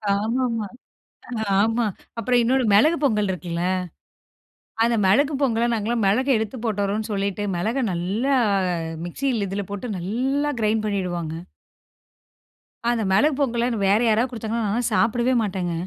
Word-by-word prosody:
ஆமாமா, 230 +1 -1 0.9
ஆமா. 225 +3 +2 0.3
அப்புறம் 245 +2 +2
இன்னொரு 255 +3 +2
மிளகு 305 +12 +5
பொங்கல் 210 -7 +2
இருக்குல்ல? 170 -1 -4 1.2
அந்த 235 0 +2
மிளகு 280 +10 +3
பொங்கல்ல 240 -3 +1
நாங்கலாம் 225 +1 -1
மிளக 220 +7 +2
எடுத்து 220 +2 -3
போட்டுறோம்ன்னு, 210 0 -1
சொல்லிட்டு 200 0 -2
மிளக 225 +10 -1
நல்லா 200 +11 0 0.7
மிக்ஸியில 230 +3 -1
இதுல 200 +2 -3
போட்டு 205 +1 -4
நல்லா 260 +10 -1
கிரைண்ட் 215 0 +1
பண்ணிவிடுவாங்க. 175 -5 -2 1.5
அந்த 235 -2 +1
மிளகு 290 +11 +4
பொங்கலன்னு 240 -3 0
வேற 200 +2 +4
யாராவது 225 +3 +2
குடுத்தாங்கன்னா 230 -1 -3
நானெல்லாம் 230 +3 -1
சாப்பிடவே 240 +3 +2
மாட்டேங்க. 185 -4 -2
220 Hz, 120 wpm, -23 LUFS, 200-245 Hz, 1.5 s, மிளகு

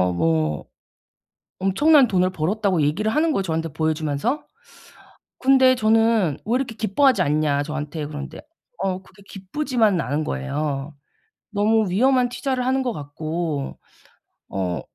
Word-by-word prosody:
그래서 90 0 +2
뭐 80 -3 0 1.0
엄청난 275 +9 +4
돈을 185 -3 +1
벌었다고 185 +1 0
얘기를 195 +10 0
하는 315 +4 +2
거예요, 195 - 0
저한테 165 -2 -2
보여 160 +1 0
주면서. 155 - -2 0.9
근데 260 -1 +5
저는 220 - +2
"왜 230 +4 +1
이렇게 255 -4 -2
기뻐하지 230 +5 +2
않냐?" 145 -1 +1
저한테 150 0 -5
그러는데 145 -1 -7 0.4
어 190 -1 -2
그게 195 +2 -19
기쁘지만은 210 - 0
않은 145 +2 -2
거예요. 145 0 -3 0.6
너무 215 0 +2
위험한 250 +5 +3
투자를 255 0 -2
하는 265 +1 +1
것 250 -2 -1
같고. 155 -1 -4 0.7
어 90 -3 -2
185 Hz, 310 characters per minute, -22 LUFS, 150-230 Hz, 1.0 s, 근데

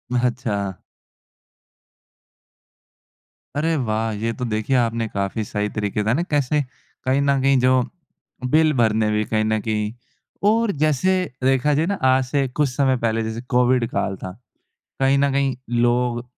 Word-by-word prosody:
अच्छा। 115 -6 -1 2.8
अरे 160 +3 +1
वाह! 110 -4 -1
ये 110 +2 -2
तो 125 - -1
देखिए 110 +3 -1
आपने 115 -1 0
काफ़ी 100 +2 -2
सही 105 0 -2
तरीक़े 105 -1 -2
बताया 110 +2 +1
न 170 - +1
कैसे 145 0 +2 0.4
कहीं 130 +2 +2
न 140 -1 +2
कहीं 135 -1 +3
जो, 130 0 +3 0.6
बिल 155 +3 +3
भरने 110 -2 +2
भी 105 0 +1
कहीं 110 0 0
न 110 0 +1
कहीं 105 -1 -2 0.5
और 225 0 +3
जैसे 155 +4 +2 0.3
देखा 135 +3 +3
जाए 155 +3 +2
ना 200 - 0
आज 130 0 +4
से 135 +1 0
कुछ 140 +2 0
समय 130 0 +1
पहले 115 -1 0
जैसे 110 +1 -4
कोविड 125 -1 +3
काल 95 - -2
था, 95 - -7 0.7
कहीं 135 +1 +3
न 140 0 +2
कहीं 135 -2 0 0.3
लोग 120 0 +1
125 Hz, 150 wpm, -22 LUFS, 110-140 Hz, 2.8 s, आज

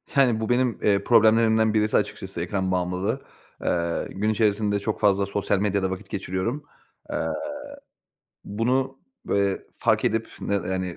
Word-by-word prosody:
Yani, 125 -5 +4
bu 110 - -3
benim, 125 -1 +1
eee, 100 -1 +3
problemlerimden 110 -1 +4
birisi 110 0 +2
açıkçası, 95 -3 -3
ekran 95 +1 -1
bağımlılığı. 90 +1 -1 0.4
Eee, 85 -1 0
gün 100 +4 -1
içerisinde 105 -1 +1
çok 105 +2 -3
fazla 100 -1 +3
sosyal 100 0 0
medyada 100 -2 +1
vakit 95 +2 -6
geçiriyorum. 100 +9 -3 0.5
Eee, - - -1 1.2
bunu, 130 +5 0 0.3
eee, 100 -1 +2 0.2
fark - - +2
edip, 115 0 0
ne 100 - -1
yani, 95 -2 -2
100 Hz, 135 wpm, -25 LUFS, 95-110 Hz, 1.2 s, Yani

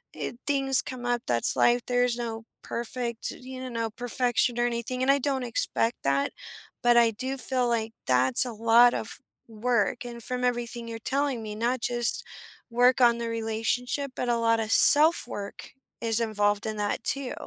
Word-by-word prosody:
eh, - - -5
things 270 -2 +4
come 250 -1 -8
up, 240 -1 0
that's 120 -1 +1
life, 240 0 +3
there's 245 -1 +1
no 225 -2 -5 0.2
perfect, 235 0 -4
you 255 0 -8
know, 230 -1 -3
perfection 245 0 0
or 240 - +2
anything, 240 +2 -4
and 270 - 0
I 280 - +2
don't 270 -1 -1
expect 230 0 -1
that, 140 0 0 0.5
but 240 0 +4
I 230 -1 +5
do 260 +5 -5
feel 255 -1 0
like 225 -1 -1
that's 130 - +4
a 245 - -5
lot 230 +2 +5
of - - -5 0.3
work, 235 +2 -1
and 235 -1 -8
from 250 0 -3
everything 240 -1 -2
you're 225 0 -6
telling 275 -1 -1
me, 210 -1 -6
not 235 +2 -1
just 240 -1 0 0.5
work 245 +2 +3
on 235 -1 +5
the 235 - -3
relationship, 230 +4 -2
but 245 - -3
a 235 - +2
lotta 230 -1 +1
self-work 290 -9 +4 0.3
is 230 -1 +1
involved 205 -2 0
in 215 - -4
that 205 0 -2
too. 275 -2 -1
240 Hz, 170 wpm, -26 LUFS, 225-250 Hz, 0.5 s, I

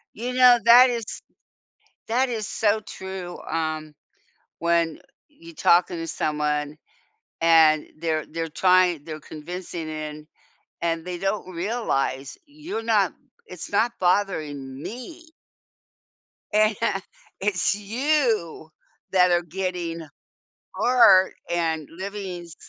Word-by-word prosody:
You 245 +3 -4
know, 250 -1 +7
that 245 +2 +8
is 235 -2 -2 1.0
that 250 +3 +1
is 220 -3 -3
so 215 0 +1
true. 190 -3 -7
Um, 155 -1 -3 0.7
when 170 -1 +1 0.3
you 330 +3 -15
talking 175 - +3
to 165 0 -5
someone, 150 -1 -2 0.6
and 160 -2 +5
they're 160 -1 -1
they're 165 0 -4
trying 180 -2 +3
they're 155 -1 -7
convincing 165 +1 -7
in, 155 0 -7 0.5
and 165 0 -1
they 180 -1 -4
don't 195 0 -2
realize 170 - -2
you're 295 -5 -6
not 210 -4 +2 0.3
"It's 180 +1 -9
not 230 +4 +2
bothering 150 -8 -1
me" 315 - -8 1.3
"and 215 0 +4 0.6
it's 200 0 +1
you 220 - -1 0.4
that 180 -1 +4
are 175 0 +3
getting 175 -1 -4 0.7
hurt 200 -7 +5 0.2
and 160 -3 -1
living 190 0 -6
s" 170 -2 -12
180 Hz, 110 wpm, -24 LUFS, 160-215 Hz, 1.3 s, that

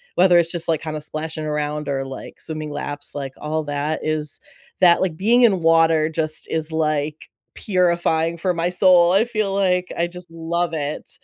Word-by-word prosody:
whether 180 -1 +5
it's 170 0 +1
just, 170 -2 -1
like, 160 -2 +1
kinda 155 -1 -5
splashing 155 +1 -5
around 150 -1 -2
or, 135 -1 -2
like, 135 0 -9
swimming 155 -1 -5
laps, 145 0 -5
like, 135 -2 -5
all 155 +1 -2
that 145 +2 -2
is 155 -1 -1 0.4
that 175 -2 +6
like, 180 -4 0
being 230 +7 +3
in 195 -7 +4
water 165 -1 +4
just 155 -1 -1
is, 160 0 -1
like, 155 -1 -2 0.3
purifying 170 -3 +1
for 180 +2 0
my 170 0 -1
soul. 180 -1 +5
I 200 +3 +4
feel, 215 -4 -2
like, 180 -2 +1
I 170 - +1
just 180 0 -10
love 165 +1 -2
it. 150 -1 -4
160 Hz, 180 wpm, -21 LUFS, 155-175 Hz, 0.4 s, that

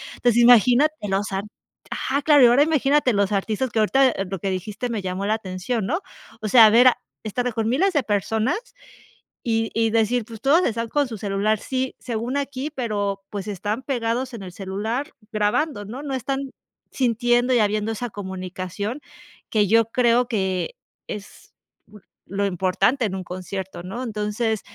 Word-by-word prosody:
entonces, 240 -1 +3
imagínate, 245 +5 +6
los 195 +2 -1
art 195 +1 -2 0.5
ajá, 280 +2 -1
claro, 295 -3 +6
y - - +9
ahora 245 +4 +5
imagínate 290 -4 +2
los 200 0 +1
artistas 215 +5 -1
que 225 - -1
ahorita, 265 +5 +4
eh, 195 - -3
lo 195 -1 -4
que 195 - -2
dijiste 205 +6 -4
me 225 -3 -2
llamó 185 +1 -3
la 215 - +2
atención, 195 +2 -3
¿no?, 320 - 0 0.4
o 215 - -2
sea, 230 +1 +9
a - - +4
ver, 240 +3 +7
a - - -2 0.3
estar 245 +3 -2
con 225 0 -1
miles 365 +11 +2
de 290 -4 +2
personas 220 - 0 0.8
y 225 -1 0
y 225 0 +2
decir, 230 +1 +1
pues, 225 -1 -11
todos 315 +8 +4
están 230 0 -1
con 290 +1 +1
su 225 - -6
celular, 205 +1 0
sí, 260 +2 -3
según 240 +2 -3
aquí, 280 +1 -3
pero, 205 -6 -2
pues, 200 0 -5
están 205 +4 -3
pegados 245 -1 -2
en 210 - -8
el 180 -2 -9
celular 210 - -3 0.2
grabando, 210 +3 0
¿no?, 240 +7 -7
no 280 -2 -4
están 270 +2 -3 0.4
sintiendo 240 0 +2
y - - +4
habiendo 210 +1 +1
esa 240 +3 -4
comunicación 190 - -5 0.5
que 210 -2 +3
yo 225 +3 +4
creo 240 0 +3
que 190 - -1 0.3
es 205 -1 -9 0.3
bu 210 -1 -16 0.3
lo 200 +1 -1
importante 190 +8 +1
en 195 -3 -2
un 190 - -4
concierto, 185 0 -6
¿no?, 220 +8 -5
entonces, 215 -1 -2
225 Hz, 175 wpm, -23 LUFS, 200-250 Hz, 0.8 s, y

